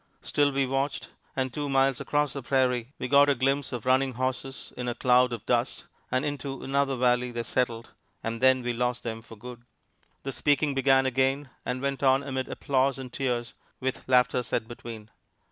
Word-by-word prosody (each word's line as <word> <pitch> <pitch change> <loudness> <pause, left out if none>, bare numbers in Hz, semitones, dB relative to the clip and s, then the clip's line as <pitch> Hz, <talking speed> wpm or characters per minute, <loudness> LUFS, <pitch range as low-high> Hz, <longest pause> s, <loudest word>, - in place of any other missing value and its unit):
Still 145 -1 +2
we 135 0 +1
watched, 135 +2 -2 0.3
and 130 -2 -1
two 145 -1 -3
miles 135 -1 +2
across 145 -2 0
the 140 - -5
prairie 125 -1 +1
we 130 - -3
got 145 +1 +6
a 140 - +3
glimpse 135 +2 0
of 120 -2 -5
running 130 +1 +3
horses 130 +2 -4
in 125 0 -4
a 120 - -1
cloud 125 0 +4
of 115 -4 -5
dust, - - 0 0.2
and 130 +3 0
into 140 -2 -4
another 140 0 +1
valley 125 0 +2
they 120 -1 -4
settled, 115 -1 -1 0.3
and 115 +1 -3
then 130 -1 +5
we 120 0 -1
lost 125 +1 -1
them 115 -1 -4
for 115 0 -13
good. 120 +2 -10 0.6
The 135 - -3
speaking 145 +1 +1
began 135 0 +4
again 130 +1 +1 0.2
and 125 +1 -2
went 140 -1 -1
on 135 0 +4
amid 130 -2 -3
applause 135 -1 +1
and 130 -2 -8
tears, 125 -3 -2 0.3
with 130 0 -4
laughter 125 0 +4
set 115 -2 -2
between. 115 -2 -9
130 Hz, 190 wpm, -27 LUFS, 125-135 Hz, 0.6 s, got